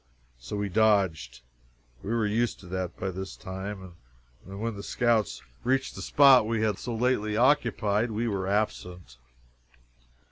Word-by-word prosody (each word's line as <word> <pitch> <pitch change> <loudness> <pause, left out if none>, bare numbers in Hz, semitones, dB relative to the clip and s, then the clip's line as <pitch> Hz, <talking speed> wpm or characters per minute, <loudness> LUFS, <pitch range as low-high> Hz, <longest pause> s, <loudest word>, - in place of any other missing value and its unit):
So - - -7
we 100 0 -2
dodged 95 - +1 0.6
we - - -7
were 115 -1 +1
used 110 +3 0
to - - -14
that 90 0 -4
by 95 - -3
this 95 +1 -7
time 95 0 -7 0.5
and 100 +1 -8
when 115 +1 -2
the 100 - -7
scouts 115 0 0 0.2
reached 130 +2 0
the - - -8
spot 135 -5 +6
we 115 -1 0
had 105 -3 0
so 120 - -4
lately 110 -3 0
occupied, 115 -4 +2
we 115 +2 -2
were 95 -3 -2
absent. 90 - -3
105 Hz, 150 wpm, -27 LUFS, 95-115 Hz, 0.6 s, spot